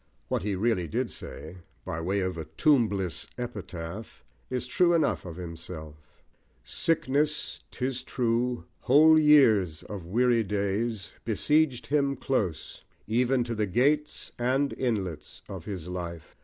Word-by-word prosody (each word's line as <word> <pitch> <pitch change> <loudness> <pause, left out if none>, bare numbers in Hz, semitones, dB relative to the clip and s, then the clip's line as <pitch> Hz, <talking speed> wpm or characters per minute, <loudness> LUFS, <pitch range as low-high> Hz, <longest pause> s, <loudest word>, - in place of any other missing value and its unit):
What - - 0
he 100 +1 -1
really 95 -3 +1
did - - -2
say, 80 +4 -9 0.3
by 85 - -3
way 95 +4 0
of 95 -1 -1
A 80 -2 -5
Tombless 100 - +1
Epitaph, 105 -5 -7 0.3
is 125 -1 -2
true 175 +7 +3
enough 160 - +1
of 85 -2 -7
himself 85 -3 -7 0.7
Sickness, 150 -1 0
'tis 130 -1 -3
true, 120 -5 -1
Whole 155 +4 +6
years 110 - +5
of 95 -5 -7
weary 120 +3 +3
days, 105 +1 -2
besieged 135 +5 +2
him 140 -1 +1
close, 95 -12 -2 0.2
Even 125 +3 +2
to 120 0 -4
the 105 -2 0
gates 145 +9 +1
and 130 +3 +1
inlets 100 - -3
of 95 -4 -8
his 95 -5 -5
life! 85 -3 -6
110 Hz, 130 wpm, -28 LUFS, 90-130 Hz, 0.7 s, Whole